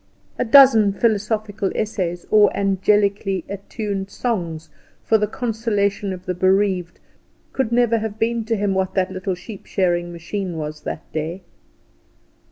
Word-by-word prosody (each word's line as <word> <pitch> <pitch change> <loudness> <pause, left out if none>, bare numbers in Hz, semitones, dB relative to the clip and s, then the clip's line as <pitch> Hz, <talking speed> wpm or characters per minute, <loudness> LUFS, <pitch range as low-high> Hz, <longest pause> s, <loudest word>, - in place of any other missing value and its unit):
A - - +3
dozen 225 -5 +7
philosophical 215 -2 0
essays, 180 -5 -2
or 210 -2 +6
angelically 200 0 +1
atuned 200 0 -5
songs 170 -9 -3 0.3
for 220 - +3
the 210 - +1
consolation 210 -4 -1
of 185 0 -7
the 185 - -1
bereaved, 185 -1 +1 0.5
could 265 -4 -1
never 235 -1 +3
have 215 -1 -4
been 230 +1 0
to 225 0 0
him 200 -2 0
what 190 -1 -1
that 190 -1 +1
little 185 0 -3
sheep 190 +3 -11
shearing 175 -2 0
machine 175 +1 -5
was 150 0 -5
that - - -4
day. 160 +4 -4
200 Hz, 140 wpm, -21 LUFS, 185-220 Hz, 0.5 s, dozen